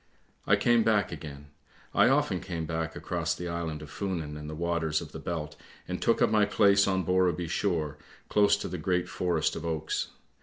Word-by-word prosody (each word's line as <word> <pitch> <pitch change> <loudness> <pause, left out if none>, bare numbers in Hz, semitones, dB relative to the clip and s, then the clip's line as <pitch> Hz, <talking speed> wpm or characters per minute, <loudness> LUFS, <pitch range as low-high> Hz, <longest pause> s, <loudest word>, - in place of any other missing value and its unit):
" - - -37
I - - +6
came 120 -1 +3
back 105 -3 +2
again; 75 -3 -9 0.4
I - - +5
often - - +2
came 85 -3 -4
back 80 0 -3
across - - -2
the 90 - -5
island 85 -3 -4
of 75 - -11
Funen 85 -7 -3
and 75 0 -7
the 75 - -5
waters 85 -2 0
of 80 -3 -9
the 80 - -7
Belt 80 -2 -4 0.3
and - - -4
took - - +3
up - - +3
my 105 -1 +4
place 100 -1 +4
on 95 -1 +1
Borreby 90 -2 +2
shore 80 -5 -1 0.3
close 105 0 +4
to 100 - -4
the 90 - -5
great 90 +2 0
forest 90 -3 0
of 80 - -5
oaks. 80 -2 -2
85 Hz, 200 wpm, -29 LUFS, 80-95 Hz, 0.4 s, I